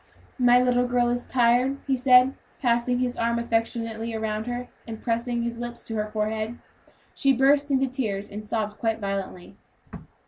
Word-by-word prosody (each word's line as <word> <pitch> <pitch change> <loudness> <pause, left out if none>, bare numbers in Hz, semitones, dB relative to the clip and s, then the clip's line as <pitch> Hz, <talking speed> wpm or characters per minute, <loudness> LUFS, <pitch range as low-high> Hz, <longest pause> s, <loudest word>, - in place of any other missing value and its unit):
"My 245 0 +6
little 250 0 +2
girl 245 -1 +2
is 245 0 -2
tired," 250 +2 +2
he 270 - +1
said, 255 0 +5 0.3
passing 240 -1 +1
his 250 -1 -1
arm 235 0 +1
affectionately 230 -1 -2
around 220 0 -3
her, 245 0 -4 0.2
and 220 -1 -6
pressing 235 0 -1
his 235 0 -4
lips 240 -1 -7
on - - -2
her 210 0 -1
forehead. 215 +2 -2 0.6
She 275 -1 +3
burst 280 +3 +3
into 270 -1 +2
tears, 220 -7 -3
and 210 +1 -7
sobbed 215 -1 -3
quite 225 -1 0
violently. 195 -3 -5
235 Hz, 165 wpm, -25 LUFS, 220-250 Hz, 0.6 s, My